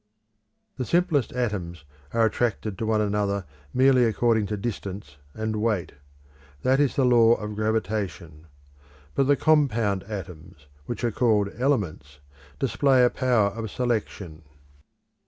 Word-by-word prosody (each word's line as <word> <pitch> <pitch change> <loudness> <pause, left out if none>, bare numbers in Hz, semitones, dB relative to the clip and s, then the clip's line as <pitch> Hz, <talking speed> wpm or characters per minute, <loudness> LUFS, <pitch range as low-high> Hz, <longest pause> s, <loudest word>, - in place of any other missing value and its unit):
The 130 - -2
simplest 165 -5 +1
atoms 95 -10 -3 0.3
are 115 -1 +3
attracted 110 -2 -1
to 110 - -2
one 110 -1 +2
another 100 -2 -1 0.3
merely 130 -1 +4
according 110 -1 +1
to 105 - -3
distance 100 -7 -6 0.2
and 110 0 -2
weight. 105 -5 -1 0.7
That 130 +1 +3
is 145 -2 +2
the 135 - +2
law 120 -2 +5
of 105 -1 -6
gravitation. 100 -7 -3 0.7
But 135 - +1
the 145 - +5
compound 120 -11 +2
atoms, 90 -8 -9 0.2
which 120 - -5
are 120 - +1
called 105 -3 +2
elements, 100 - -1 0.4
display 135 - +3
a 125 - +2
power 120 -6 +2
of 110 +1 -6
selection. 105 -9 -3
110 Hz, 130 wpm, -25 LUFS, 100-125 Hz, 0.7 s, law